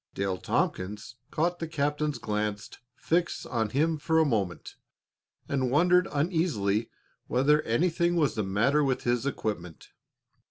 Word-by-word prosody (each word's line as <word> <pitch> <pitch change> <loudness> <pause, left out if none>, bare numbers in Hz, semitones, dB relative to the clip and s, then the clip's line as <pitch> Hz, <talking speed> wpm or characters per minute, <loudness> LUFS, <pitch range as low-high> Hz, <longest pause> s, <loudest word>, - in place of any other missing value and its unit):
Dale 95 -2 -1
Tompkins 105 +6 -2
caught 175 +3 0
the 165 - -3
captain's 150 -1 -1
glance 105 -1 -3 0.2
fixed 170 +5 -1
on 115 -4 -1
him 155 +6 +1
for 160 +2 +1
a 160 - +5
moment, 100 - -2 0.7
and 130 -3 0
wondered 180 +6 +4
uneasily 140 - 0 0.4
whether 145 +5 +3
anything 170 +7 +1
was 155 -5 +2
the 110 - -1
matter 115 +10 +2
with 135 -2 0
his 120 +2 0
equipment. 90 - -4
140 Hz, 130 wpm, -28 LUFS, 105-160 Hz, 0.7 s, a